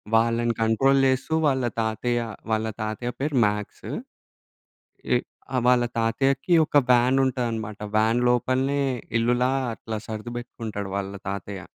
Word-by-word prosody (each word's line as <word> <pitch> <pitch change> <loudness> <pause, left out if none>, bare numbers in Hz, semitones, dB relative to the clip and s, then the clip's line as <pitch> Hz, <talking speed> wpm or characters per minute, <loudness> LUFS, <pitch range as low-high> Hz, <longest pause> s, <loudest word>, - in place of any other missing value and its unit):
వాళ్ళని 115 +1 +2
కంట్రోల్ 135 +5 +3
చేస్తూ 130 +4 0
వాళ్ళ 130 -3 +1 0.2
తాతయ్య, 120 +2 0 0.3
వాళ్ళ 110 0 +1 0.2
తాతయ్య 110 +3 -3
పేరు 140 -1 -1
మాక్స్. 105 0 -3 1.3
ఎ - - +6 0.4
ఆ! - - +2
వాళ్ళ 125 -1 +4
తాతయ్యకి 135 +8 +1
ఒక 145 - +2
వ్యాన్ 125 +2 +4
ఉంటదనమాట. 115 -5 -2 0.2
వ్యాన్ 110 +3 +3
లోపలనే 130 +3 +1 0.4
ఇల్లులా 120 +2 +2 0.2
అట్లా 110 0 -5
సర్ది 110 +2 -6
పెట్టుకుంటాడు 110 -5 -6
వాళ్ళ 100 0 -4 0.2
తాతయ్య. 100 0 -5
120 Hz, 120 wpm, -25 LUFS, 110-130 Hz, 1.3 s, ఎ